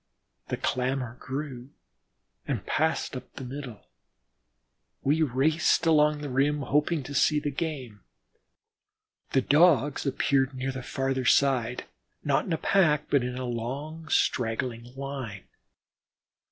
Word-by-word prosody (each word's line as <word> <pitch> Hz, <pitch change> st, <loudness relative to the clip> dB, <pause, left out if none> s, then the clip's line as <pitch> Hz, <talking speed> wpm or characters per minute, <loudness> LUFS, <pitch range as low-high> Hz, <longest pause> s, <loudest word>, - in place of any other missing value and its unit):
The -, -, -2 dB
clamor 125 Hz, -1 st, -1 dB
grew 130 Hz, -2 st, -5 dB, 0.8 s
and -, -, -2 dB
passed 160 Hz, -2 st, 0 dB
up 125 Hz, 0 st, -8 dB
the -, -, -7 dB
middle. 125 Hz, -4 st, -8 dB, 1.2 s
We 150 Hz, +4 st, +2 dB
raced 155 Hz, +5 st, +2 dB
along 150 Hz, -2 st, +4 dB
the 145 Hz, -, -4 dB
rim, 145 Hz, +3 st, +2 dB
hoping 150 Hz, +2 st, +1 dB
to 140 Hz, -, -7 dB
see 150 Hz, +2 st, +3 dB
the 145 Hz, 0 st, -2 dB
game. 135 Hz, -, -4 dB, 1.3 s
The 135 Hz, -, +3 dB
Dogs 145 Hz, -2 st, +4 dB
appeared 135 Hz, 0 st, +1 dB
near 130 Hz, +1 st, -2 dB
the 130 Hz, 0 st, -6 dB
farther 135 Hz, 0 st, -2 dB
side, 125 Hz, -2 st, +3 dB, 0.4 s
not 140 Hz, -2 st, +1 dB
in 175 Hz, -, -2 dB
a -, -, +1 dB
pack, 155 Hz, -7 st, +2 dB
but 140 Hz, -, +4 dB
a 125 Hz, +1 st, -3 dB
long, 140 Hz, +7 st, -5 dB
straggling 115 Hz, -2 st, 0 dB
line. 135 Hz, -8 st, -6 dB
135 Hz, 125 wpm, -27 LUFS, 125-150 Hz, 1.3 s, along